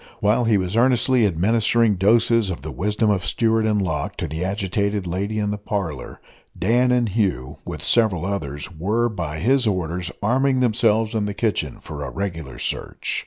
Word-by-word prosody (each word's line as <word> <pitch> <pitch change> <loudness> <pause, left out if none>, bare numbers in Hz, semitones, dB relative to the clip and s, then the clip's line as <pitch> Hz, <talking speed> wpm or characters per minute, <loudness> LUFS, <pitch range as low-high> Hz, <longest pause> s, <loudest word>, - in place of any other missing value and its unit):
While 110 +4 +2
he 110 -2 +3
was 95 +1 -2
earnestly 125 -1 +3
administering 110 +5 +2
doses 110 +2 +3
of 90 - -5
the - - -5
wisdom 105 - 0
of 95 -3 0
Stewart 115 -1 +1
and 105 -1 +1
Locke 95 -2 -2
to - - -3
the 80 +4 -4
agitated 100 +1 -1
lady 100 +5 -2
in 105 -1 0
the 105 - -4
parlour, 90 -10 -4 0.4
Dan 120 +6 +2
and 120 -3 +2
Hugh, 95 - -1
with - - -6
several 105 -8 +3
others, 75 -8 -4
were, 110 +9 0
by 85 -8 -4
his 125 - +2
orders, 90 -2 -2
arming 130 +4 +2
themselves 115 -2 +2
in 110 -2 0
the 105 -1 -4
kitchen 110 -3 -1
for - - -7
a - - -4
regular 80 -9 -5
search. - - -3
105 Hz, 175 wpm, -22 LUFS, 90-115 Hz, 0.4 s, he